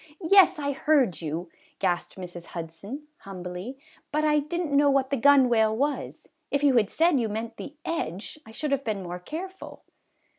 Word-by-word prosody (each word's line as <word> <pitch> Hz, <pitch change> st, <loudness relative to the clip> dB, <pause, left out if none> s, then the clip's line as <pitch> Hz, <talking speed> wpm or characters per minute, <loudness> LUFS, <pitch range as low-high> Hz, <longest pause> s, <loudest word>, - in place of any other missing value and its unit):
" 295 Hz, -, -26 dB
Yes, 385 Hz, 0 st, +6 dB
I 285 Hz, -1 st, -1 dB
heard 270 Hz, -, +2 dB
you," 165 Hz, +3 st, -4 dB, 0.3 s
gasped 180 Hz, -3 st, -1 dB
Mrs. 175 Hz, -2 st, -8 dB
Hudson, 170 Hz, -, -7 dB
humbly; 185 Hz, +5 st, -7 dB, 0.2 s
" -, -, -30 dB
but 305 Hz, +1 st, +1 dB
I 300 Hz, -1 st, +4 dB
did 315 Hz, +4 st, -3 dB
n't 320 Hz, -5 st, -3 dB
know 285 Hz, 0 st, +5 dB
what 275 Hz, -1 st, +2 dB
the -, -, +3 dB
gunwale 240 Hz, -5 st, +4 dB
was; 285 Hz, +3 st, -2 dB, 0.2 s
if 285 Hz, 0 st, 0 dB
you 280 Hz, -3 st, +5 dB
had 210 Hz, -3 st, +3 dB
said 330 Hz, -4 st, +3 dB
you 225 Hz, -2 st, 0 dB
meant 225 Hz, +2 st, -5 dB
the 290 Hz, -, -8 dB
edge 205 Hz, -, -4 dB
I -, -, -15 dB
should 275 Hz, +6 st, -4 dB
have 275 Hz, -1 st, +1 dB
been 210 Hz, -5 st, -2 dB
more 175 Hz, 0 st, -6 dB
careful." 370 Hz, -, -8 dB
260 Hz, 190 wpm, -26 LUFS, 190-295 Hz, 0.3 s, Yes